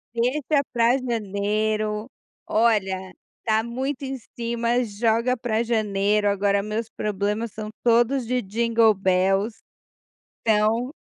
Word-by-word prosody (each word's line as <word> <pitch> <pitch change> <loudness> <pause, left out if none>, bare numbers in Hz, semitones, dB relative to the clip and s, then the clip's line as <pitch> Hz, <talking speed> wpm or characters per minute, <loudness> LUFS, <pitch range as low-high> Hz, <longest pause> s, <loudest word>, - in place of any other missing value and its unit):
Deixa 280 +5 +1
para 235 +1 +3
janeiro, 215 -1 -1 0.4
olha, 195 -4 +1 0.3
está 220 0 +1
muito 260 +4 -3
em 265 0 -3 0.2
cima 235 +1 0
joga 230 +3 +1
para 230 -1 -1
janeiro, 210 -2 +1
agora 200 0 +1
meus 215 +2 -3
problemas 210 +2 -2
são 215 0 -7
todos 240 +1 +3
de 250 0 +1
jingle 225 +2 +3
bells, 195 +3 +1 0.8
então 225 +4 +2
220 Hz, 110 wpm, -24 LUFS, 205-235 Hz, 0.8 s, para